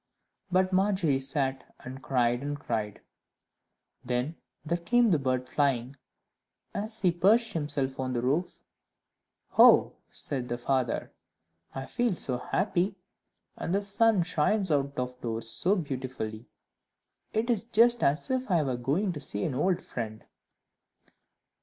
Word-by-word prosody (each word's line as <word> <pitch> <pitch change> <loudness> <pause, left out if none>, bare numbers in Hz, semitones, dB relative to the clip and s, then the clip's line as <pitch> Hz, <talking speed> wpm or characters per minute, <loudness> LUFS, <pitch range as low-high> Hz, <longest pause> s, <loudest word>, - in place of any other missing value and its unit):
But 185 +1 +2
Margery 185 -7 +2
sat, 135 -1 -2
and 130 +2 -8
cried 120 -2 +1
and 145 +1 -4
cried. 110 -6 -3 1.0
Then 125 +5 -2 0.3
there 170 +3 -1
came 235 +5 +3
the 160 - +3
bird 130 -1 -1
flying, 135 -3 0 0.8
and 200 - -2
as 220 0 -5
he 180 - +4
perched 215 +6 +3
himself 145 -4 -2
on 130 -1 -2
the 120 - -1
roof, 150 +8 -1 1.0
"Oh," - - +7 0.2
said 125 -3 -2
the 120 - -2
father, 125 -1 -1 0.6
"I 135 0 -4
feel 240 - 0
so 125 -6 -1
happy, 190 +7 0 0.6
and 175 - -2
the 200 - 0
sun 205 -1 +3
shines 180 +3 +1
out 140 -1 0
of 125 0 -4
doors 115 -1 -2
so 190 - +2
beautifully! 130 - -5 0.8
It 230 +3 0
is 225 -1 -1
just 235 +1 +4
as 150 - +1
if 260 -2 -1
I 170 -4 +3
were 130 -3 -2
going 155 +11 0
to 150 - -6
see 105 -7 -4
an - - -2
old 175 +7 0
friend. 110 -2 -6
145 Hz, 140 wpm, -28 LUFS, 125-190 Hz, 1.0 s, Oh